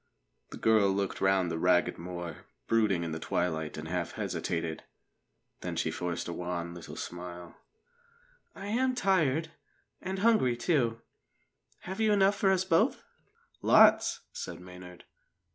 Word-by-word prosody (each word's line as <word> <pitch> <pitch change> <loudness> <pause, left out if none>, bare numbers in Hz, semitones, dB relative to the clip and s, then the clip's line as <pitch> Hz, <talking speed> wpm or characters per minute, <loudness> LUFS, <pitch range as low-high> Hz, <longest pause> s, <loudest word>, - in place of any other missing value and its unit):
The - - -8
girl 110 -3 +4
looked 100 0 -2
round 95 -2 +2
the 80 - -2
ragged 90 0 +2
moor, 85 -2 -7 0.2
brooding 105 -6 +2
in 85 - -4
the 80 - -4
twilight, 80 -3 -2
and 80 +1 -6
half 85 0 -3
hesitated. 80 -1 -3 0.8
Then - - -5
she - - 0
forced 90 -1 -3
a 85 - -4
wan 85 -1 -4
little 85 -1 -9
smile. 85 -1 -7 1.0
"I 195 - -8
am 255 +5 +1
tired, 160 - +1 0.5
and 190 +1 -4
hungry, 195 - +3
too. 120 -4 +1 0.8
Have 190 +4 -5
you 220 -1 +3
enough 200 0 +4
for 200 -1 +2
us 190 -1 +2
both?" 165 -3 +2 0.6
"Lots!" - - +5
said - - -6
Maynard. 90 0 -12
95 Hz, 140 wpm, -30 LUFS, -, 1.0 s, Lots